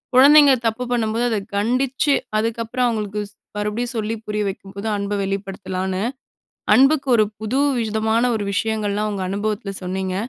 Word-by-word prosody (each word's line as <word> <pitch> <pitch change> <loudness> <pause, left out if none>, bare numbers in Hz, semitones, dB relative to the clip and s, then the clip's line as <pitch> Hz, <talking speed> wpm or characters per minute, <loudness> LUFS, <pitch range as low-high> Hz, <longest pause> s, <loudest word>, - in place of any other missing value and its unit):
"குழந்தைங்க 285 +2 +8
தப்பு 225 +2 0
பண்ணும்போது, 230 0 0
அத 220 -3 0 0.2
கண்டிச்சு, 255 +6 +1 0.3
அதுக்கப்பறம் 230 +2 -2
ஸ் - - +4
அவுங்களுக்கு 210 -2 -2 0.4
மறுபடியும் 210 +4 -2
சொல்லி 220 0 -1
புரிய 210 0 -1
வைக்கும்போது 195 +2 -7
அன்ப 200 0 -3
வெளிப்படுத்தலான்னு" 190 -1 -3 0.7
அன்புக்கு 275 +1 +4
ஒரு 215 -1 +4
புது 220 +5 -1 0.2
விதமான 220 +1 0
ஒரு 205 -2 -3
விஷயங்கள்லாம் 210 0 -1
உங்க 195 -2 -3
அனுபவத்துல 205 +1 -2
சொன்னீங்க. 185 0 -3
215 Hz, 135 wpm, -21 LUFS, 200-235 Hz, 0.7 s, குழந்தைங்க